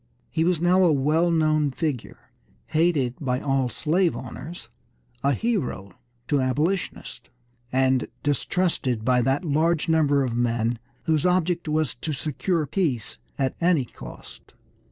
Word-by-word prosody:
He 160 - +1
was 175 -1 +2
now 180 +2 +4
a 175 - +5
well 155 +5 +2
known 155 -3 +2
figure, 140 -2 -4 0.3
hated 155 -5 +1
by 125 -3 0
all 135 -3 0
slave 170 - +1
owners, 170 +3 -8 0.6
a 140 +1 +3
hero 165 - -2 0.4
to 145 -2 +2
Abolitionists, 150 +9 -2 0.4
and 130 0 +2 0.2
distrusted 145 -5 0
by 125 -1 +3
that 135 +8 0
large 160 +2 +1
number 145 -4 +3
of 125 -3 -2
men 120 -1 0 0.2
whose 155 -3 +1
object 180 -2 +1
was 155 -3 0
to 155 +5 -4
secure 155 +3 -1
peace 140 - -2 0.2
at 135 -2 0
any 170 -6 +3
cost. - - -12
150 Hz, 135 wpm, -25 LUFS, 130-170 Hz, 0.6 s, a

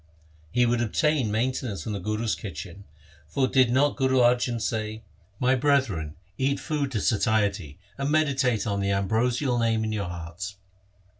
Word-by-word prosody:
He 125 +6 +3
would 120 0 +1
obtain 135 +2 +1
mainten 125 +4 -1
ance 100 -3 -5
from 110 - -4
the 100 - -3
Guru's 110 +4 -1
kitchen, 90 +1 -7 0.4
for 130 - +1
did 130 -2 +4
not 140 +3 +2
Guru 130 -1 +2
Arjan 120 -1 +3
say: 110 +1 -3 0.2
— 100 +4 -34
My 130 +1 +3
brethren, 130 - +1 0.2
eat 135 +1 +1
food 145 -4 -2
to 110 - 0
satiety, 100 -8 0 0.2
And 140 +1 -1
meditate 135 -7 +2
on 100 -2 -1
the 100 0 0
ambrosial 120 +6 +1
Name 115 -1 +1
in 110 - -2
your 100 -4 -2
hearts. 85 +3 -6
115 Hz, 165 wpm, -26 LUFS, 100-130 Hz, 0.4 s, did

